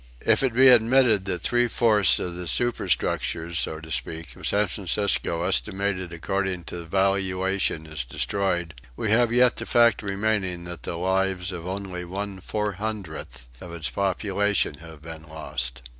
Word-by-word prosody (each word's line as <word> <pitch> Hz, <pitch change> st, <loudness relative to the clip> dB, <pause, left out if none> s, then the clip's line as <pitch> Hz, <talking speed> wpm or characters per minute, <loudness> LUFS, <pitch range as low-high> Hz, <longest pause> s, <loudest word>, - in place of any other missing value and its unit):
If -, -, +4 dB
it 130 Hz, -4 st, 0 dB
be 130 Hz, +2 st, +7 dB
admitted 120 Hz, -4 st, +5 dB
that 90 Hz, -3 st, -2 dB
three 120 Hz, 0 st, +3 dB
fourths 110 Hz, -4 st, +4 dB
of 90 Hz, -, -4 dB
the 90 Hz, 0 st, -6 dB
superstructures, 85 Hz, -7 st, 0 dB
so 80 Hz, -, -2 dB
to 80 Hz, 0 st, -11 dB
speak, 80 Hz, -3 st, -4 dB
of -, -, -5 dB
San 105 Hz, +1 st, +3 dB
Francisco, 95 Hz, -3 st, -1 dB
estimated 95 Hz, 0 st, -1 dB
according 90 Hz, +2 st, -2 dB
to 85 Hz, 0 st, -7 dB
valuation, 95 Hz, -2 st, 0 dB
is 80 Hz, -3 st, -5 dB
destroyed, 85 Hz, +5 st, -1 dB, 0.2 s
we 105 Hz, -, -2 dB
have 120 Hz, +1 st, +4 dB
yet 125 Hz, 0 st, +4 dB
the -, -, -4 dB
fact 115 Hz, -2 st, +4 dB
remaining 100 Hz, -3 st, -1 dB
that 85 Hz, 0 st, -7 dB
the -, -, -4 dB
lives 95 Hz, +1 st, 0 dB
of 90 Hz, -1 st, -6 dB
only 95 Hz, -1 st, -4 dB
about 90 Hz, 0 st, -9 dB
one 100 Hz, -1 st, -4 dB
four 105 Hz, +3 st, -2 dB
hundredth 90 Hz, -, -5 dB
of 90 Hz, -, -8 dB
its 80 Hz, -3 st, -3 dB
population 100 Hz, -4 st, 0 dB
have 80 Hz, -2 st, -12 dB
been 80 Hz, -1 st, -8 dB
lost. 65 Hz, -5 st, -5 dB
95 Hz, 160 wpm, -25 LUFS, 85-105 Hz, 0.2 s, be